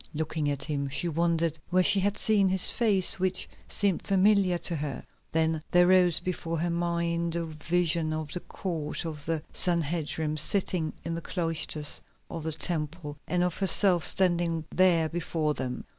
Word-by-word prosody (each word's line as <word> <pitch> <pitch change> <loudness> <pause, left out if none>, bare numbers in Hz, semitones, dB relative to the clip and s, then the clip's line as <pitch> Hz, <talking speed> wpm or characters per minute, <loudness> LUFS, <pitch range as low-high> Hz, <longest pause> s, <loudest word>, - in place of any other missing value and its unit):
Looking 155 -1 -2
at 140 -1 -3
him 140 -2 -3
she 135 +5 0
wondered 165 -1 0
where 185 0 +3
she 195 - +5
had 200 +1 0
seen 205 -3 +3
his 185 -1 +3
face, 200 -6 +3
which 185 0 0 0.2
seemed 200 -4 +1
familiar 195 -2 +2
to 170 - 0
her. 145 -2 -5 0.3
Then 160 -1 0
there 175 0 +4
rose 180 -2 +4
before 165 -2 -4
her 170 +2 -1
mind 170 0 -1
a 170 -1 -2
vision 160 +1 -1
of 155 -1 -4
the 180 - -4
Court 165 -4 -5
of 155 -3 -6
the 165 -2 -2
Sanhedrim 160 -3 -1
sitting 175 -1 +1
in 165 - -3
the 165 - -4
cloisters 165 -4 -1 0.3
of 165 - -5
the 160 +1 -4
Temple, 155 -1 -4
and 180 0 0
of 180 -2 -2
herself 185 -2 +5
standing 170 -3 +1
there 175 -4 +3
before 160 -2 -2
them. 125 -3 -5
170 Hz, 165 wpm, -27 LUFS, 155-180 Hz, 0.3 s, she